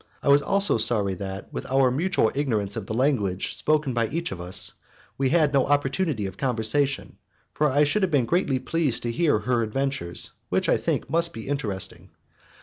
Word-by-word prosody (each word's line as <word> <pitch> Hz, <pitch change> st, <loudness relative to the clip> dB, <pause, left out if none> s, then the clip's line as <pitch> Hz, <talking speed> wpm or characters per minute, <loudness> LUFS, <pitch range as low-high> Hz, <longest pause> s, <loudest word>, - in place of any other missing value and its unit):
I -, -, +1 dB
was 140 Hz, +1 st, +6 dB
also 195 Hz, -, +2 dB
sorry 105 Hz, -4 st, +1 dB
that, 95 Hz, +1 st, -7 dB
with -, -, -5 dB
our 135 Hz, -1 st, +4 dB
mutual 155 Hz, -4 st, +1 dB
ignorance 110 Hz, -8 st, -1 dB
of 105 Hz, -4 st, -5 dB
the -, -, -3 dB
language 115 Hz, -8 st, 0 dB
spoken 150 Hz, -3 st, +1 dB
by 115 Hz, -1 st, +1 dB
each 165 Hz, +6 st, -2 dB
of 90 Hz, -2 st, -6 dB
us, 90 Hz, +1 st, -1 dB, 0.4 s
we 135 Hz, -1 st, +1 dB
had 155 Hz, -2 st, +3 dB
no 135 Hz, -2 st, +3 dB
opportunity 145 Hz, -, 0 dB
of 95 Hz, -, -6 dB
conversation, 135 Hz, +3 st, -1 dB, 0.3 s
for 150 Hz, 0 st, +1 dB
I 145 Hz, +3 st, +3 dB
should 150 Hz, +9 st, +1 dB
have 190 Hz, -, +2 dB
been 140 Hz, -7 st, +2 dB
greatly 155 Hz, -3 st, +1 dB
pleased 135 Hz, 0 st, 0 dB
to 120 Hz, -, -1 dB
hear 150 Hz, +1 st, +2 dB
her 120 Hz, +3 st, 0 dB
adventures, 115 Hz, -6 st, -2 dB, 0.2 s
which, -, -, +1 dB
I -, -, +4 dB
think, -, -, -2 dB
must 170 Hz, +4 st, 0 dB
be 115 Hz, -, -8 dB
interesting. 110 Hz, -10 st, -4 dB
135 Hz, 190 wpm, -25 LUFS, 110-145 Hz, 0.4 s, was